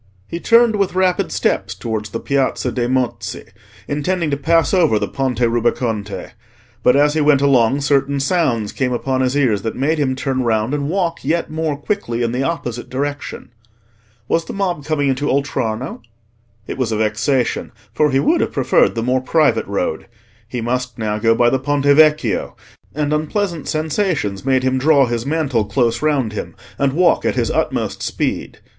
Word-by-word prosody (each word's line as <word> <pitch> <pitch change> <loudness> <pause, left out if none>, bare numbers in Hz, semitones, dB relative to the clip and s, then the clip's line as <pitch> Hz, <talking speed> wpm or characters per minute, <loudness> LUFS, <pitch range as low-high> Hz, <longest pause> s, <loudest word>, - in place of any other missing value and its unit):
He 170 - -5
turned 230 +1 +4
with 195 -2 0
rapid 185 -1 +1
steps - - -1
towards 110 -2 -4
the 115 - -4
Piazza 135 -2 0
dei 120 +1 -1
Mozzi, 130 -1 -2 0.4
intending 155 +2 -1
to - - +2
pass 165 +5 +2
over 165 - +4
the - - -1
Ponte 130 -3 -2
Rubaconte; 115 -3 -1 0.5
but 125 - +4
as 145 +1 +4
he 155 - +1
went 145 -2 +4
along 135 -1 +3
certain 140 0 +1
sounds 135 - 0
came 125 -2 -1
upon 130 +2 -1
his 130 +2 +1
ears 115 -8 +2
that 110 - -4
made 150 +5 0
him 130 -3 0
turn 135 -1 -1
round 115 +1 0
and 145 -1 -1
walk 170 -2 -1
yet 165 +4 -1
more 155 -2 -2
quickly 145 - -2
in 115 - 0
the 125 +2 -1
opposite 125 -6 -3
direction. 145 -1 -4 0.8
Was 165 0 0
the - - -7
mob 180 -6 -2
coming 145 -2 0
into 135 +2 0
Oltrarno? 130 -3 -2 0.6
It - - -6
was 120 -3 0
a 110 - 0
vexation, 115 +4 0 0.2
for 150 -1 +2
he 135 -1 +2
would 325 - +2
have - - -1
preferred 130 -3 +2
the 115 - -1
more 125 +1 +1
private 155 +3 +2
road. 95 -5 -2 0.4
He 120 0 -4
must 125 +1 -2
now 105 -2 -2
go 115 +1 +3
by 120 0 +3
the 135 - +1
Ponte 145 +1 -1
Vecchio; 145 -7 +3 0.4
and 150 0 0
unpleasant 165 +2 -2
sensations 155 - -1
made 130 -1 +2
him 130 0 +1
draw 140 0 +4
his 120 +1 -3
mantle 140 -7 0
close 115 +2 0
round 140 -8 0
him, 105 - -6 0.2
and 140 -1 +1
walk 175 +2 +3
at - - 0
his - - 0
utmost - - -1
speed. - - -3
135 Hz, 180 wpm, -18 LUFS, 120-155 Hz, 0.8 s, turned